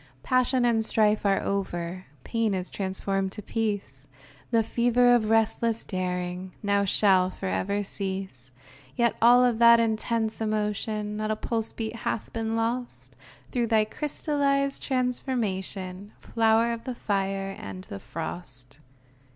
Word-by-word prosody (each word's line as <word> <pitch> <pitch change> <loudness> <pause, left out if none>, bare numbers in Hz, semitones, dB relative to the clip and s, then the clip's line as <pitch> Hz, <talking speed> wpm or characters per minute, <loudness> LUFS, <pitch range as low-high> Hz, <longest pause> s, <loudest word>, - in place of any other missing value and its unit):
Passion 255 -1 +2
and 225 -2 +3
strife 215 -1 +2
are 195 -1 +3
over; 185 -2 -3 0.2
Pain 225 -3 0
is 185 -1 -4
transformed 195 0 -2
to 210 - -4
peace, 205 - -3 0.4
The 230 -2 +3
fever 245 +2 +3
of 220 -3 +2
restless 225 +1 +2
daring 180 -1 -3
Now 200 0 +2
shall 190 -2 +4
forever 200 +2 -2
cease. 190 - -4 0.5
Yet 235 -1 +3
of - - -19
all 245 +1 +6
that 235 +1 +7
intense 225 0 0
emotion 210 0 -1
Not 215 0 -2
a 215 - +1
pulse 225 0 -2
beat 225 0 -5
hath 225 - -3
been 225 0 -2
lost 235 +2 -3 0.4
Through 240 -2 0
thy 220 -1 +3
crystallized 280 +1 -1
transformation, 210 -7 -2
Flower 225 +1 +2
of 230 0 -7
the 255 - -4
fire 195 -2 -2
and 95 -1 -7
the 100 - -8
frost 130 - -7
215 Hz, 135 wpm, -27 LUFS, 190-230 Hz, 0.5 s, that